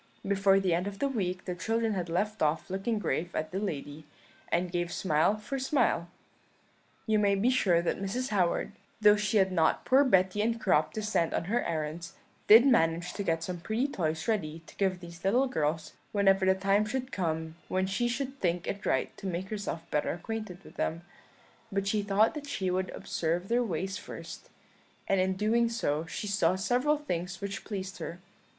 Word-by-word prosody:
Before 195 Hz, 0 st, +4 dB
the 190 Hz, -3 st, +1 dB
end 175 Hz, +3 st, 0 dB
of 200 Hz, -1 st, -5 dB
the 280 Hz, -, +1 dB
week 190 Hz, -8 st, -2 dB
the 180 Hz, -, -2 dB
children 225 Hz, +4 st, 0 dB
had 180 Hz, -3 st, -3 dB
left 210 Hz, +6 st, -1 dB
off 155 Hz, +4 st, 0 dB
looking 195 Hz, +4 st, -1 dB
grave 170 Hz, -2 st, -2 dB
at 155 Hz, 0 st, -2 dB
the 190 Hz, -, -2 dB
lady, 150 Hz, -5 st, -5 dB, 0.4 s
and 175 Hz, +1 st, +1 dB
gave 175 Hz, -1 st, -1 dB
smile 165 Hz, +4 st, +2 dB
for 270 Hz, +6 st, -4 dB
smile. 245 Hz, -, +1 dB, 1.0 s
You 220 Hz, -1 st, +2 dB
may 200 Hz, -1 st, +3 dB
be 220 Hz, +6 st, +2 dB
sure 180 Hz, -9 st, +3 dB
that 175 Hz, -, -1 dB
Mrs. 245 Hz, +7 st, -2 dB
Howard, 185 Hz, -5 st, +1 dB, 0.3 s
though 210 Hz, -1 st, +7 dB
she 210 Hz, 0 st, +1 dB
had 190 Hz, -1 st, +3 dB
not 165 Hz, -3 st, +2 dB
poor 265 Hz, +2 st, +5 dB
Betty 190 Hz, -5 st, +3 dB
and 230 Hz, +1 st, 0 dB
Crop 155 Hz, -7 st, +2 dB
to 215 Hz, -, -3 dB
send 175 Hz, -6 st, +1 dB
on -, -, 0 dB
her 230 Hz, +8 st, 0 dB
errands, 165 Hz, +1 st, -4 dB, 0.3 s
did 225 Hz, +4 st, +9 dB
manage 175 Hz, -8 st, +2 dB
to -, -, -4 dB
get 165 Hz, -4 st, 0 dB
some 180 Hz, 0 st, -4 dB
pretty 220 Hz, +9 st, -1 dB
toys 160 Hz, -, -2 dB
ready 165 Hz, -7 st, -1 dB
to -, -, -15 dB
give 190 Hz, -2 st, 0 dB
these 170 Hz, -1 st, -11 dB
little 240 Hz, +8 st, +3 dB
girls 155 Hz, -, -1 dB, 0.2 s
whenever 195 Hz, -2 st, +3 dB
the 190 Hz, -, +5 dB
time 195 Hz, +2 st, +2 dB
should 255 Hz, +4 st, -3 dB
come 160 Hz, -5 st, -2 dB
when 185 Hz, 0 st, 0 dB
she 195 Hz, +5 st, 0 dB
should 270 Hz, +3 st, -3 dB
think 175 Hz, -1 st, 0 dB
it 200 Hz, -, -4 dB
right 130 Hz, -, 0 dB
to 195 Hz, -, -6 dB
make 185 Hz, +1 st, -3 dB
herself 205 Hz, -6 st, -4 dB
better 150 Hz, -, +1 dB
acquainted 195 Hz, 0 st, -6 dB
with -, -, -15 dB
them; 165 Hz, +2 st, -2 dB, 0.7 s
but 195 Hz, 0 st, -1 dB
she 205 Hz, +1 st, +1 dB
thought 205 Hz, +2 st, +3 dB
that 295 Hz, -2 st, -7 dB
she 190 Hz, -9 st, -1 dB
would 185 Hz, 0 st, -1 dB
observe 170 Hz, +3 st, -2 dB
their 240 Hz, +1 st, +3 dB
ways 190 Hz, 0 st, -3 dB
first, -, -, -9 dB, 0.6 s
and 195 Hz, -, +2 dB
in 190 Hz, 0 st, +2 dB
doing 225 Hz, +4 st, +2 dB
so 160 Hz, -9 st, -1 dB
she 185 Hz, -, -5 dB
saw 195 Hz, -4 st, +2 dB
several 250 Hz, +10 st, +1 dB
things 190 Hz, -, -4 dB
which 200 Hz, 0 st, -5 dB
pleased 195 Hz, -2 st, -5 dB
her. 170 Hz, -, -6 dB
195 Hz, 195 wpm, -30 LUFS, 170-215 Hz, 1.0 s, did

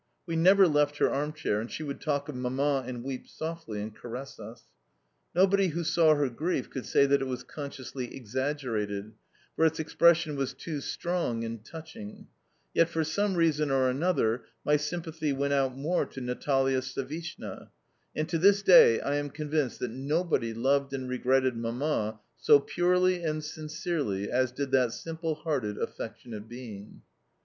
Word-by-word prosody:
We 165 Hz, -2 st, -3 dB
never 190 Hz, +4 st, +6 dB
left 145 Hz, -1 st, +2 dB
her -, -, +3 dB
arm 145 Hz, +2 st, -1 dB
chair, 105 Hz, -8 st, -1 dB
and 115 Hz, -, -6 dB
she 155 Hz, -, -5 dB
would 140 Hz, -2 st, -5 dB
talk 145 Hz, -2 st, -1 dB
of 150 Hz, -, -6 dB
Mamma, 130 Hz, +2 st, 0 dB
and 125 Hz, -2 st, -5 dB
weep 130 Hz, -1 st, -5 dB
softly, 160 Hz, -10 st, -5 dB
and 110 Hz, 0 st, -7 dB
caress 125 Hz, +3 st, -8 dB
us. 110 Hz, +2 st, -10 dB, 0.7 s
Nobody 195 Hz, +1 st, +4 dB
who 170 Hz, +1 st, -2 dB
saw 160 Hz, -1 st, +4 dB
her 145 Hz, -1 st, +1 dB
grief 135 Hz, +3 st, -2 dB
could 130 Hz, -, -5 dB
say 140 Hz, -, +4 dB
that 140 Hz, 0 st, +3 dB
it -, -, 0 dB
was 125 Hz, -1 st, -4 dB
consciously 130 Hz, -2 st, -7 dB
exaggerated, 115 Hz, -5 st, -3 dB, 0.4 s
for -, -, +1 dB
its 160 Hz, 0 st, +3 dB
expression 165 Hz, 0 st, +3 dB
was 135 Hz, -1 st, -2 dB
too 150 Hz, +1 st, -5 dB
strong 170 Hz, -9 st, -2 dB
and 115 Hz, -1 st, -5 dB
touching; 160 Hz, -7 st, -10 dB, 0.5 s
yet 165 Hz, -, +4 dB
for 165 Hz, -1 st, 0 dB
some 195 Hz, +5 st, 0 dB
reason 155 Hz, -3 st, +2 dB
or 130 Hz, -1 st, +3 dB
another 130 Hz, -6 st, +1 dB, 0.2 s
my 150 Hz, -, +4 dB
sympathy 160 Hz, 0 st, -2 dB
went 140 Hz, +1 st, 0 dB
out 135 Hz, -2 st, +1 dB
more 160 Hz, +6 st, 0 dB
to -, -, -9 dB
Natalia 135 Hz, +1 st, +1 dB
Savishna, 135 Hz, +6 st, -6 dB, 0.5 s
and 155 Hz, 0 st, -1 dB
to 165 Hz, -, -1 dB
this 200 Hz, +3 st, +5 dB
day 470 Hz, -, +8 dB
I 145 Hz, +1 st, 0 dB
am 145 Hz, 0 st, -2 dB
convinced 150 Hz, -2 st, -1 dB
that 125 Hz, -, -2 dB
nobody 140 Hz, -1 st, 0 dB
loved 135 Hz, +4 st, +1 dB
and 130 Hz, -1 st, -3 dB
regretted 130 Hz, 0 st, +2 dB
Mamma 115 Hz, -1 st, -1 dB, 0.2 s
so 145 Hz, -, +6 dB
purely 180 Hz, +3 st, +2 dB
and 155 Hz, -1 st, -1 dB
sincerely 150 Hz, -, -3 dB
as 130 Hz, 0 st, +2 dB
did 135 Hz, +1 st, -4 dB
that 125 Hz, -3 st, +3 dB
simple 165 Hz, -1 st, -3 dB
hearted, 140 Hz, -10 st, -2 dB
affectionate 110 Hz, -1 st, -6 dB
being. 115 Hz, -5 st, -9 dB
140 Hz, 165 wpm, -29 LUFS, 125-160 Hz, 0.7 s, day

